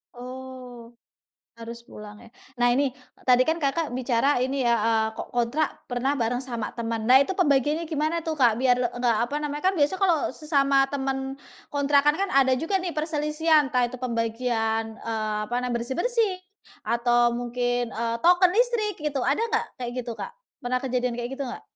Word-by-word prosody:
Oh, 250 -1 -9 0.7
harus 235 0 -8
pulang 210 -2 -11
ya. 235 - -15 0.3
Nah 245 0 +3
ini 275 +2 +2 0.4
tadi 250 0 +6
kan 320 +3 0
Kakak 290 +2 0
bicara 255 +2 +1
ini 265 +1 -1
ya, 235 0 +4
eee, 220 0 +2
kok - - -6
kontrak 245 +6 -1
pernah 255 +3 -1
bareng 240 0 0
sama 235 -4 -4
teman 230 -1 -3
nah 255 +3 +7
itu 380 +7 -1
pembagiannya 295 -1 +2
gimana 315 +1 -1
tuh 320 - -2
Kak? 240 -4 +5
Biar 250 0 +3
enggak 245 -1 0
apa 285 - -4
namanya, 295 0 -4
kan 385 - -3
biasa 295 +3 +2
kalau 345 -9 +2
sesama 275 -3 +2
teman, 270 -1 -3 0.3
kontrakan 285 +1 +3
kan 395 +1 -1
ada 265 -1 +4
juga 330 +8 0
nih 350 -3 -4
perselisihan 305 -1 +1
entah 250 -1 +1
itu 245 +1 -7
pembagian, 225 -2 -1
eee, 215 -2 -3
apa 240 - -4
nam 250 0 -2
bersih-bersih 370 - 0 0.5
atau 240 +1 +2
mungkin, 245 0 -1
eee, 230 0 -2
token 355 +1 +5
listrik 460 -4 +1
gitu 295 -2 -1
ada 280 - +1
nggak 445 - +1
kayak 245 -2 -4
gitu 240 -1 -6
Kak? 485 - -6 0.3
Pernah 250 +1 0
kejadian 250 -2 -1
kayak 240 0 -4
gitu 280 - -4
nggak? 245 - -7
260 Hz, 175 wpm, -25 LUFS, 240-300 Hz, 0.7 s, nah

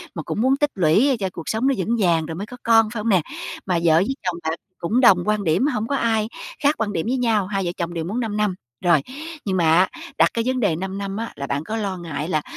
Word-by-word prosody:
mà - - -4
cũng - - -3
muốn 265 +3 +3
tích 295 0 +1
lũy 205 - +3
cho 190 -2 -1
cuộc 165 - -7
sống 225 +5 +1
nó 275 - +3
vững 220 +6 0
vàng 170 -4 +2
rồi 160 0 -5
mới 195 +5 -4
có 250 - -10
con, 225 -1 +5
phải 220 - -3
hông 225 +2 -1
nè? 185 -5 +4 0.4
Mà 180 -3 +1
vợ 160 -2 +5
với 205 +11 +2
chồng 180 -2 0
bạn 160 0 -1 0.2
cũng 225 +10 +1
đồng 180 -7 +6
quan 210 -1 +1
điểm, 180 - +2
hổng 225 -5 -1
có 280 - 0
ai 220 -3 +1 0.4
khác 290 +2 +4
quan 210 -2 -2
điểm 165 - -1
với 260 +2 +1
nhau, 220 -6 +1
hai 195 -2 -2
vợ 175 - -1
chồng 170 0 -3
đều 165 -1 -3
muốn 210 +7 -2
5 220 -3 -2
năm. 210 -3 +1 0.3
Rồi, 170 -5 +5 0.4
nhưng 190 -2 0
mà 165 -3 +3
á, 185 - +4 0.3
đặt - - +5
cái 230 - 0
vấn 255 0 0
đề 200 -8 +2
5 190 +3 -4
năm 200 0 -4
á 230 +1 -4
là 140 - -5
bạn 140 +2 -2
có 220 +6 -4
lo 195 -3 -2
ngại 165 -3 -4
là, 155 -3 +1
200 Hz, 280 wpm, -22 LUFS, 175-230 Hz, 0.4 s, đồng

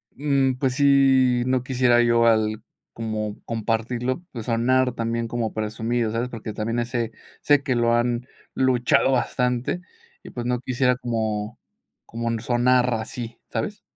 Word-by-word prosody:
Mm, 135 -2 +1
pues, 130 0 -1
sí, 135 -3 +4
no 130 -1 +1
quisiera 125 -2 +3
yo 120 0 +3
al 110 -1 +2 0.3
como 110 -2 -4
compartirlo, 115 +4 -2
pues, 115 -4 -7
sonar 125 +2 +2
también 115 0 -2
como 115 -2 -2
presumido, 110 +1 -1
¿sabes?, 115 +2 -1
porque 115 -2 -6
también, 115 +3 -2
ese 120 -1 -2 0.3
sé 145 -1 +3
que 135 -4 0
lo 120 0 +2
han 120 +1 0 0.3
luchado 130 0 +2
bastante 125 +4 0 0.4
y, - - -12
pues, 120 -1 -5
no 125 0 0
quisiera 125 0 +1
como 110 -3 -3 0.5
como 115 0 -3
sonar 125 +1 +2
así, 115 +1 -6
¿sabes? - - -4
120 Hz, 140 wpm, -23 LUFS, 115-125 Hz, 0.5 s, sí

